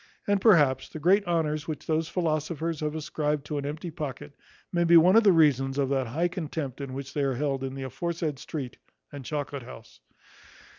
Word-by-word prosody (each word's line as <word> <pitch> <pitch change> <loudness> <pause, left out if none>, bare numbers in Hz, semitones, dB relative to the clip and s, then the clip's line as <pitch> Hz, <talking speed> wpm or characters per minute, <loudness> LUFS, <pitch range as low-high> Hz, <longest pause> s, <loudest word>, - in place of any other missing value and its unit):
And, 200 -1 +1
perhaps, 150 - +4
the - - -8
great 185 +6 +4
honours 155 -3 0
which 155 -2 -5
those 160 0 0
philosophers 160 -1 -2
have 150 0 -2
ascribed 150 -1 -2
to 150 -2 -3
an 140 - -4
empty 155 +4 -5
pocket 145 -2 -6 0.4
may 175 0 +2
be 170 0 +7
one 180 +4 +6
of 225 - +7
the 200 - +6
reasons 140 -5 +3
of 140 -2 +1
that 135 -2 0
high 160 +9 0
contempt 155 -6 -5
in 135 -2 -6
which 140 +1 -6
they 145 - -1
are 135 -2 0
held 135 0 -1
in 135 0 -4
the 135 - -5
aforesaid 160 +1 -3
street 140 -4 -6 0.3
and 140 -2 -8
chocolate 145 -1 -4
house. - - -13
150 Hz, 200 wpm, -27 LUFS, 140-165 Hz, 0.4 s, be